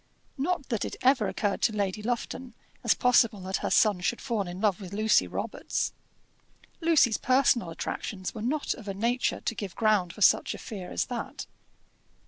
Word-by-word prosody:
Not 290 -1 -1
that 230 -5 -1
it - - -4
ever 255 -5 +4
occurred 205 -2 -1
to - - +3
Lady 200 0 -1
Lufton 245 +1 -4 0.3
as - - +4
possible 235 -4 +3
that 190 +1 -2
her - - -3
son 210 -4 +4
should 215 +6 -1
fall 225 -7 -2
in 175 +1 -6
love 205 -2 +1
with 190 0 -8
Lucy 215 +1 +3
Robarts. - - -3 0.9
Lucy's 320 -9 +4
personal 255 -6 +3
attractions 185 +3 -4
were 220 - -7
not 285 +6 -1
of 225 -5 -12
a 195 - -3
nature 235 +5 0
to - - -2
give 200 -4 -6
ground 210 -6 +2
for 210 - -13
such - - +4
a - - -8
fear 190 -5 -7
as - - -1
that. 245 -2 -5
220 Hz, 180 wpm, -28 LUFS, 195-245 Hz, 0.9 s, ever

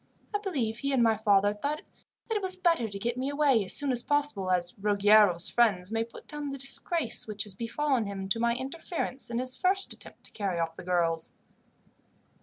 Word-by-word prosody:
I 410 - +1
believe 260 - -2
he 275 +1 -1
and 250 -3 +3
my 225 -1 +4
father 205 -1 +3
thought 285 +9 -3 0.4
that 450 - -3
it 415 - 0
was 375 -1 -1
better 335 -11 +1
to 200 - -6
get 235 +4 -2
me 260 +2 -1
away 285 -6 +3
as 185 - -1
soon 285 -2 +3
as 245 -1 +1
possible, 285 -10 0
as 180 -1 +1
Ruggiero's 205 -3 +4
friends 205 -6 +2
may 225 0 0
put 230 - -13
down 295 -1 -5
the 275 - -5
disgrace 275 0 -1
which 210 -1 -1
has 205 - -7
befallen 235 +2 -1
him 195 -1 -5
to 230 - +2
my 235 0 +2
interference 270 0 -3
in 235 - -3
his 255 +1 -1
first 385 +5 +2
attempt - - -3
to - - -4
carry 195 -5 -2
off 165 0 -2
the - - -9
girls." 170 -2 0
235 Hz, 210 wpm, -29 LUFS, 200-285 Hz, 0.4 s, my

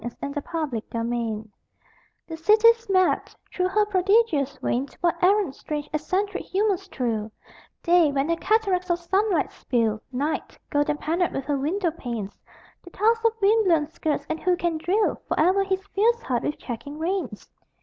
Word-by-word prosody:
OF 240 0 -5
HER 280 - -4
GLORIOUS 295 -8 -3
MADNESS 230 -2 -2 0.8
The 325 - -7
city's 440 +6 +4
mad: 370 -1 +2 0.2
through 365 0 +1
her 420 +3 +2
prodigious 375 - +2
veins 265 +2 -2
What 345 0 0
errant, 390 -5 +3
strange, 295 0 -5
eccentric 370 +6 -1
humors 390 -1 0
thrill: 225 - -2 0.5
Day, 340 -3 +4
when 275 +1 0
her 335 - +1
cataracts 380 -2 +1
of 345 - +2
sunlight 360 -1 0
spill 225 -3 -1
Night, 285 +5 -3
golden 290 0 +1
panelled 335 +4 -1
with 270 - -3
her 290 -1 0
window 340 +5 0
panes; 235 -10 -6 0.5
The 355 - -12
toss 450 +5 +1
of 455 -1 +3
wind 435 +2 +4
blown 330 -5 +3
skirts; 315 -2 -2
and 320 - -3
who 360 +1 +1
can 340 -3 -1
drill 400 +7 0
Forever 370 +5 +3
his 385 0 -2
fierce 465 +4 +2
heart 245 -3 -1
with 295 - -2
checking 280 +4 -7
reins? 325 - -3
340 Hz, 160 wpm, -25 LUFS, 280-390 Hz, 0.8 s, city's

